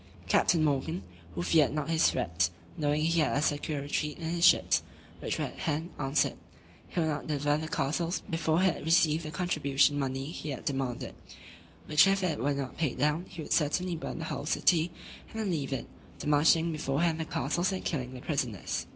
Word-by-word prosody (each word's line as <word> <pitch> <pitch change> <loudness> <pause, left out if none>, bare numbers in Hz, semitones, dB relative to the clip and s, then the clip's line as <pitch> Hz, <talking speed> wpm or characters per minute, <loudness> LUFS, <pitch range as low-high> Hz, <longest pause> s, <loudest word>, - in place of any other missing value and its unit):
Captain 165 -3 +3
Morgan, 155 +4 0 0.3
who 85 - -2
feared 150 - +3
not 150 -2 -2
his 165 0 +4
threats, 85 0 0 0.3
knowing 150 -2 0
he 165 +1 +2
had 155 - +2
a - - +1
secure 145 -1 -1
retreat 150 +1 -2
in 160 -1 -4
his 170 0 -1
ships, - - +5 0.4
which - - -2
were - - -1
at - - -9
hand, 160 +2 -2
answered, 135 +1 +1 0.5
"he - - -3
would 165 - +2
not 150 -1 -3
deliver 145 -1 +1
the 160 - -4
castles, 160 +5 -1
before 165 0 +1
he - - +4
had 185 - +1
received 160 0 +3
the 155 - -5
contribution 145 -5 +1
money 135 -1 -2
he 155 0 -6
had 135 - -5
demanded; 135 -5 -2 0.7
which 150 +3 +5
if 195 0 +2
it 165 -5 0
were 140 +3 0
not 135 -2 -5
paid 155 -6 -1
down, 150 +6 +1
he 165 - -7
would - - -2
certainly 170 +4 +1
burn 160 - -5
the 165 - -4
whole 150 - -4
city, 165 0 +3 0.4
and 225 - -7
then 210 -4 -1
leave 145 -5 -2
it, 130 -4 -2 0.3
demolishing 155 +3 +3
beforehand 155 +2 0
the - - 0
castles, 175 +6 0
and 190 - -4
killing 130 -5 -3
the 125 - -8
prisoners." 125 - -2
155 Hz, 200 wpm, -30 LUFS, 140-165 Hz, 0.7 s, ships